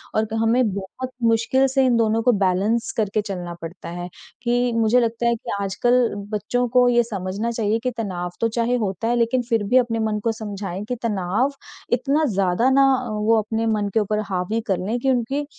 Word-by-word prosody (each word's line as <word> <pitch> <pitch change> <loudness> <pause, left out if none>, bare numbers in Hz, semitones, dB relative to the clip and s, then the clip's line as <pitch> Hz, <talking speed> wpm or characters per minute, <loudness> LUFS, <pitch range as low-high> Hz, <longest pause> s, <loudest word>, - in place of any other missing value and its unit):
और 215 - +2
क 225 - 0
हमें 230 +3 +3
बहुत 200 +6 -6
मुश्किल 230 +4 +3
से 265 0 +2
इन 250 -2 +3
दोनों 225 0 +2
को 250 - +5
बैलेंस 205 +6 +1
करके 215 -1 +1
चलना 180 -4 -5
पड़ता 165 +2 -8
है, 175 +1 -5 0.4
कि 245 0 +1
मुझे 230 +2 +3
लगता 230 0 -1
है 235 - +3
कि 220 - -7
आजकल 240 +6 +2 0.3
बच्चों 245 +4 -1
को 250 0 +6
ये 240 0 +4
समझना 205 0 -3
चाहिए 225 -1 0
कि 255 - 0
तनाव 180 -5 -3
तो 230 - +3
चाहे 235 +2 0
होता 205 -1 -2
है, 240 - +2
लेकिन 240 +2 +2
फिर 225 -3 +2
भी 245 +6 +3
अपने 235 -3 +1
मन 215 -1 0
को 230 - +2
समझाएँ 200 -3 -5
कि 250 - -3
तनाव 210 +4 0 0.4
इतना 280 +5 +1
ज़्यादा 195 +4 +2
ना 275 +1 +5 0.3
वो 215 +2 +2
अपने 225 +1 -2
मन 210 -2 0
के - - +3
ऊपर 210 0 0
हावी 185 +4 -1
कर 190 -3 +1
लें 230 +4 -1
कि 270 - 0
उनकी, 260 +4 -1
225 Hz, 205 wpm, -22 LUFS, 200-240 Hz, 0.4 s, को